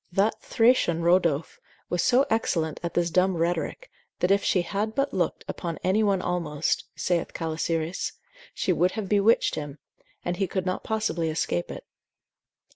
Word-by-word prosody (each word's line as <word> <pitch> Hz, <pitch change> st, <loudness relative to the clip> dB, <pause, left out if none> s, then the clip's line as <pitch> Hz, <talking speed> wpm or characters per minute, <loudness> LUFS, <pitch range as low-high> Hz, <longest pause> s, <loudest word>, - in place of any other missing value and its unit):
That 195 Hz, +5 st, +1 dB
Thracian 225 Hz, -8 st, +3 dB
Rodophe 170 Hz, -3 st, +2 dB, 0.3 s
was 175 Hz, -1 st, 0 dB
so 255 Hz, +2 st, +4 dB
excellent 165 Hz, -8 st, 0 dB
at 170 Hz, -1 st, -4 dB
this 175 Hz, -1 st, +1 dB
dumb 185 Hz, +1 st, +2 dB
rhetoric, 175 Hz, -, -2 dB, 0.3 s
that 180 Hz, -, +1 dB
if 200 Hz, 0 st, +3 dB
she 180 Hz, -, +2 dB
had 210 Hz, +4 st, -2 dB
but 275 Hz, +1 st, 0 dB
looked -, -, -1 dB
upon 170 Hz, -2 st, -4 dB
any 190 Hz, +4 st, +2 dB
one 200 Hz, -3 st, +2 dB
almost 165 Hz, -4 st, -1 dB
(saith 175 Hz, -2 st, -1 dB
Calisiris) 165 Hz, +1 st, -2 dB, 0.4 s
she 185 Hz, -, 0 dB
would 180 Hz, +2 st, +2 dB
have 215 Hz, -3 st, -4 dB
bewitched 205 Hz, +3 st, +3 dB
him, 145 Hz, -1 st, -5 dB, 0.5 s
and 175 Hz, 0 st, -1 dB
he 195 Hz, -, 0 dB
could 185 Hz, +1 st, -2 dB
not 185 Hz, 0 st, -2 dB
possibly 195 Hz, -7 st, -1 dB
escape 90 Hz, -, -1 dB
it. -, -, -8 dB
180 Hz, 160 wpm, -26 LUFS, 165-200 Hz, 0.5 s, so